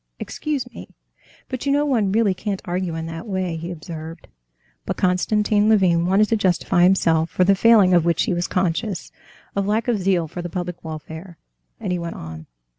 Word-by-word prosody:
"Excuse 285 -5 -3
me, - - -9 0.6
but 255 +1 -5
you - - +3
know 290 +1 +2
one 225 -9 +1
really 210 -2 +3
can't 195 +1 -4
argue 175 -1 -2
in 160 0 -4
that 165 +4 -7
way," 185 -4 -2
he 165 +2 -6
observed. 165 -1 -8 0.6
But - - -4
Konstantin 210 +3 +2
Levin 180 -5 +3
wanted 200 +3 +4
to 225 - +3
justify 180 -3 +1
himself 170 -3 +3
for 185 - +1
the 195 +2 +5
failing, 200 -2 +5
of 175 -2 +5
which 170 0 +2
he - - 0
was 175 0 -1
conscious, 185 +2 -2 0.4
of 200 0 0
lack 220 +3 0
of 235 -4 +1
zeal 185 -3 +1
for 175 +3 -6
the 175 - -5
public 175 0 -5
welfare, 160 +2 -8 0.4
and - - -3
he 180 - -1
went 170 0 -5
on. 80 0 -9
180 Hz, 190 wpm, -22 LUFS, 170-205 Hz, 0.6 s, the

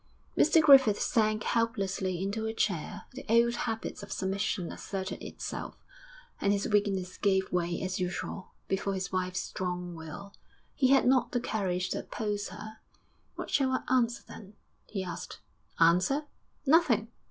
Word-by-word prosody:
Mr 320 +1 +5
Griffith 270 -8 +7
sank 215 -2 +1
helplessly 195 -5 0
into 220 +3 -2
a 220 - -3
chair, 180 -8 -1
the 265 - -8
old 235 +1 +5
habit 225 -3 -3
of 200 - -9
submission 190 -1 -1
asserted 190 0 -5
itself, - - -6 0.6
and 200 - +2
his 200 0 0
weakness 200 -3 0
gave 190 -2 +2
way 175 -1 0
as 185 0 -2
usual 180 +1 -4 0.2
before 195 0 -1
his 190 0 -3
wife's 185 -1 -1
strong 180 -1 -4
will. 165 +5 -9 0.4
He 260 - +3
had 270 +1 +5
not 255 0 +3
the 245 - +2
courage 185 -5 -1
to - - -1
oppose 210 -2 -3
her. 215 +1 -9 0.6
'What - - -6
shall 270 -2 +3
I 260 - 0
answer, 235 -2 +1
then?' 205 0 -11 0.3
he 195 -3 -3
asked. 180 - -6 0.4
'Answer? 180 - +4 0.4
Nothing.' 270 -8 +4
200 Hz, 150 wpm, -30 LUFS, 185-230 Hz, 0.6 s, Griffith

